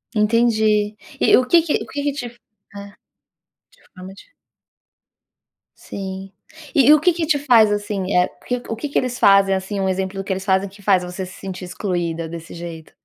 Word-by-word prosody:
Entendi. 215 -1 +2 0.3
E - - +6
o 255 - +2
que 335 +3 +5
que 315 -2 -2
o - - -11
que 285 - -5
que 290 - 0
te 275 -4 -5
é, 210 -4 -13 0.9
de - - -27
forma 185 +1 -10
dif - - -18 1.5
Sim. 190 0 -7 0.4
E 285 +1 +7
o 305 - +5
que 350 +2 +3
que 335 -1 -2
te 300 -3 +3
faz 230 -7 +4
assim 205 -1 -2 0.6
o 225 - -3
que 255 +6 -5
que - - -1
eles 250 0 -1
fazem 195 -1 +5
assim 190 +1 -3
um 190 - 0
exemplo 190 +1 -2
do 195 - -3
que 190 - -2
eles 190 0 -5
fazem 190 0 +1
que 200 +1 -16
faz 190 -2 +2
você 180 +1 -6
se 185 - -12
sentir 185 -1 -7
excluída 175 -3 -3
desse 165 0 -9
jeito? 165 -2 -9
200 Hz, 190 wpm, -20 LUFS, 190-235 Hz, 1.5 s, E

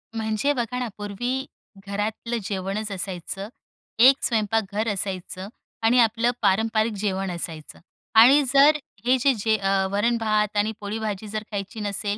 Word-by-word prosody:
म्हणजे 220 +6 0
बघा 250 -1 -3
ना 250 - -2
पूर्वी 245 +6 -3 0.4
घरातलं 215 +4 -3
जेवणच 195 +2 -3
असायचं. 195 +1 -5 0.5
एक 265 +3 +6
स्वयंपाक 225 -1 +1
घर 215 +2 -1
असायचं 185 -1 -4 0.4
आणि 240 +3 +4
आपलं 230 +1 +3
पारंपरिक 220 +2 +2
जेवण 195 -2 -1
असायचं. 165 -3 -6 0.4
आणि 265 +6 +8
जर 290 +2 +6 0.3
हे 255 +1 +4
जे 275 +2 +3
जे 220 +1 +1
अ, 195 -1 +1
वरण-भात 215 -1 +1
आणि 210 +2 +2
पोळी-भाजी 210 0 -4
जर 215 +1 -4
खायची 200 +1 -5
नसेल, 205 0 -2
215 Hz, 140 wpm, -24 LUFS, 200-230 Hz, 0.5 s, आणि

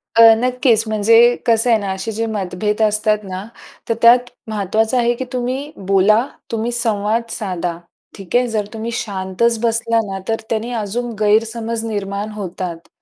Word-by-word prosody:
अ, 230 - +6 0.2
नक्कीच 250 -2 +2
म्हणजे 215 +1 +3 0.3
कसं 230 +1 +3
आहे 225 -2 +4
ना? 200 -2 -3
असे 190 +4 -4
जे 225 +2 -2
मतभेद 210 +1 -2
असतात 215 0 +2
ना, 185 0 -6 0.5
तर - - +3
त्यात 245 +1 +6 0.2
महत्त्वाचं 215 +4 0
आहे 240 0 +2
की 260 - -5
तुम्ही 260 +4 -3 0.2
बोला, 205 +4 +4 0.3
तुम्ही 230 +1 -1
संवाद 230 -1 0
साधा, 180 -4 -3 0.4
ठीक 195 0 -6
आहे. 245 0 +3
जर 215 -3 -1
तुम्ही 225 +1 -4
शांतच 205 +3 -1
बसला 230 0 +2
ना, 195 - -4
तर 225 0 -1
त्याने 230 +2 -2
अजून 240 +4 -3
गैरसमज 225 +2 0
निर्माण 205 -1 -3
होतात 180 -4 -6
220 Hz, 155 wpm, -18 LUFS, 200-230 Hz, 0.5 s, अ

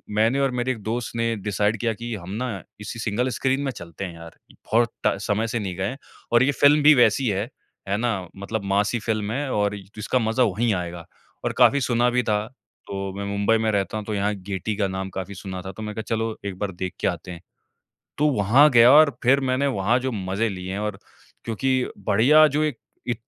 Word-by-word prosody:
मैंने 115 +6 +3
और 135 -2 +2
मेरे 125 +1 -1
एक 115 -4 -5
दोस्त 115 +1 -3
ने 115 0 0
डिसाइड 105 +1 0
किया 115 -2 0
कि 120 +2 -6
हम 90 -2 -9
ना 115 -6 -4 0.2
इसी 115 +2 -6
सिंगल 115 +4 -1
स्क्रीन 135 +2 0
में 135 - -1
चलते 85 -2 -9
हैं 85 - -7
यार! 85 0 -12
बहुत 115 +1 0
ट - - +1
समय 105 +2 0
से 115 +1 -2
नहीं 95 -3 -4
गए। 100 +8 -2 0.3
और 120 +1 +5
ये 145 - +3
फ़िल्म 145 +1 +6
भी 155 +1 +8
वैसी 125 +1 +3
है, 100 +5 -2 0.4
है 100 - +1
ना? 105 -6 -1
मतलब 100 +2 -4
मासी 105 +4 +1
फ़िल्म 105 -1 -2
है 135 +2 -2
और 105 0 +1 0.2
जिसका 105 +4 0
मज़ा 115 +2 +1
वही 110 +2 +1
आएगा, 85 -2 -4 0.4
और - - 0
काफी 140 -1 +5
सुना 120 0 +2
भी 125 0 +1
था। 105 0 0 0.4
तो 100 -1 -4
मैं 100 - -4
मुंबई 100 +3 +1
में 110 0 0
रहता 100 +1 -1
हूँ 105 - -5
तो 110 - -4
यहाँ 105 +1 0
गेटी 95 +2 -4
का 100 -2 +1
नाम 95 0 -4
काफी 95 +2 -6
सुना 95 -1 -6
था। 95 0 -7
तो 110 - -10
मैंने 105 0 -5
कहा 110 - -3
चलो 110 0 -2
एक 95 -2 -4
बार 100 -2 -2
देख 90 0 -5
के - - 0
आते 90 - -4
हैं। 85 0 -9 0.8
तो 150 +1 +3
वहाँ 120 +9 +5
गया 120 +1 +7
और 150 -1 +6
फिर 135 +3 +5
मैंने 135 +2 +1
वहाँ 115 -1 +1
जो 130 +1 -2
मज़े 100 +2 -1
लिए 95 -1 -6
हैं 100 - -3
और 105 -2 -3 0.5
क्योंकि 130 +3 0 0.2
बढ़िया 135 +10 +6
जो 150 +1 +2
एक 150 -6 -2 0.3
इ - - +2
110 Hz, 225 wpm, -23 LUFS, 100-125 Hz, 0.8 s, भी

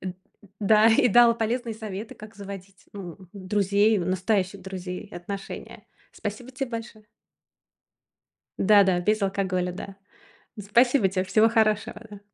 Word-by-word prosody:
Эд 185 -1 -6 0.4
да, 215 +2 +5
и 225 +2 +4
дал 235 +2 +6
полезные 230 0 -2
советы, 215 -1 -7
как 215 0 -13
заводить, 195 -1 -10
ну, 185 -5 -8
друзей, 200 +2 +1
настоящих 185 +2 -1
друзей, 185 +1 -7
отношения. 195 +3 -8 0.3
Спасибо 215 +5 -6
тебе 260 -1 -4
большое. 225 -2 -7 1.5
Да-да, 195 -3 +4
без 215 +3 +1
алкоголя, 185 -2 -1
да. 195 +1 -8 0.6
Н 210 - -7
спасибо 235 +1 +3
тебе, 185 0 -1
всего 215 +4 +4
хорошего, 215 -2 +1
да. 205 -1 -11
205 Hz, 125 wpm, -25 LUFS, 190-220 Hz, 1.5 s, дал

